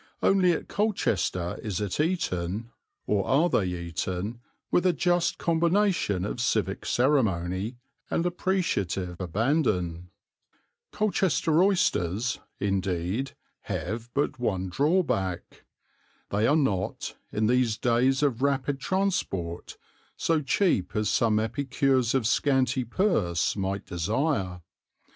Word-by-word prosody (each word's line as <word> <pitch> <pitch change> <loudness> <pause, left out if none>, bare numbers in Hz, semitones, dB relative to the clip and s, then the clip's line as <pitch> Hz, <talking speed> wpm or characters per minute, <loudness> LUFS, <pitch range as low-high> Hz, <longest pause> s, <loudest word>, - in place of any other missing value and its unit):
Only 185 -2 +4
at - - -4
Colchester 95 - -1
is 100 -5 -3
it 105 +2 -3
eaten, 115 - -1 0.3
or 100 -2 +1
are 155 +6 +3
they 100 - +2
eaten, 90 +5 -3 0.3
with 175 - +3
a 180 - +3
just 175 +2 +1
combination 170 - +1
of 115 +3 -3
civic 105 -4 0
ceremony 110 -5 +1 0.3
and 170 - 0
appreciative 165 - -1
abandon. 90 - 0 0.8
Colchester 180 -5 +2
oysters, 120 - +1 0.2
indeed, 95 +5 -1 0.3
have 115 +5 -4
but 140 -2 0
one 95 -6 -1
drawback. 135 - 0 0.7
They 105 +2 +2
are 145 - +4
not, 105 -12 -1 0.2
in 110 - 0
these 120 -1 +2
days 130 +3 +2
of 130 -4 +1
rapid 140 0 0
transport, 135 - -2 0.4
so 165 -2 +1
cheap 135 - +1
as 105 -1 +1
some 110 -2 +2
epicures 130 +1 +1
of 130 -4 +1
scanty 130 +1 +2
purse 110 - +1
might 100 0 -2
desire. 95 - -1
120 Hz, 110 wpm, -27 LUFS, 95-155 Hz, 0.8 s, Only